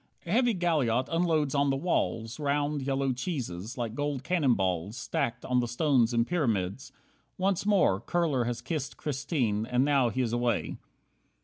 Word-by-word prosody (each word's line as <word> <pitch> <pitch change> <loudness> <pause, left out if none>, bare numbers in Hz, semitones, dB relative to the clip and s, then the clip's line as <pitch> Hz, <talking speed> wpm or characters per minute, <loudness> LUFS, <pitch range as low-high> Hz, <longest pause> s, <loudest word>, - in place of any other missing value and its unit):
A 170 - -5
heavy 240 +1 +3
galliot 145 -9 +1
unloads 165 -4 +1
on 140 0 +2
the 135 - +1
walls 120 -7 -1
Round, 145 0 0
yellow 135 0 0
cheeses, 125 - -4
like 115 -3 -3
gold 145 0 -2
cannon 145 -6 +2
balls 95 +3 -1
Stacked 125 -1 -2
on 125 -1 +2
the 120 - 0
stones 120 -1 +2
in 115 -1 +2
pyramids. 115 - -1 0.5
Once 190 +1 0
more 180 - +3
Kurler 145 -3 0
has 120 -1 -3
kissed 150 -1 -4
Christine, 125 -7 -1
and 125 +2 +2
now 140 -4 +3
he 130 +3 -1
is 115 -1 -2
away. 120 0 0
130 Hz, 165 wpm, -29 LUFS, 120-150 Hz, 0.5 s, heavy